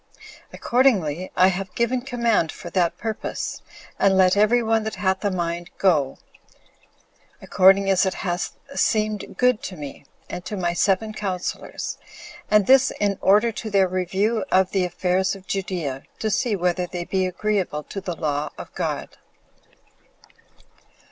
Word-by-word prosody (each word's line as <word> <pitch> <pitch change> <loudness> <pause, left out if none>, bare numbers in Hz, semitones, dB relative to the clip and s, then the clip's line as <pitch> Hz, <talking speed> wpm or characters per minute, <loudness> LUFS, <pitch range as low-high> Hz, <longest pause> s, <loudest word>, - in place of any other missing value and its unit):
Accordingly, 190 - +1
I 185 +1 +6
have 190 0 -4
given 240 +2 +1
command 235 -9 +1
for 175 - -10
that 175 -2 +1
purpose; 220 -2 -4 0.4
and 195 -1 +4
let 185 0 +5
every 220 +4 +4
one 225 0 +2
that 220 0 -4
hath 190 0 0
a 205 - +2
mind 175 -1 -3
go, 150 -8 +2 1.2
according 195 +1 +4
as 190 0 +3
it 190 - -2
hath 175 -2 -3 0.2
seemed 215 -5 0
good 250 -3 +3
to 185 - -7
me, 145 -1 -9 0.2
and 180 - -6
to 200 +3 -5
my 175 -2 0
seven 195 +4 +1
counselors, 190 -4 -4 0.5
and 210 -1 +4
this 265 +2 +5
in 200 -2 0
order 210 +4 +4
to 220 0 -6
their 195 -2 +3
review 190 +5 0
of 190 0 +3
the 190 -2 +1
affairs 180 +2 0
of 195 -1 -13
Judea, 175 -9 -3 0.2
to 220 - -2
see 220 +1 +1
whether 180 -1 0
they 175 -1 -5
be 190 0 0
agreeable 185 -5 -1
to 195 - -7
the 180 -2 -4
law 150 -2 -2
of - - -10
God. - - -4
190 Hz, 150 wpm, -23 LUFS, 180-215 Hz, 1.2 s, I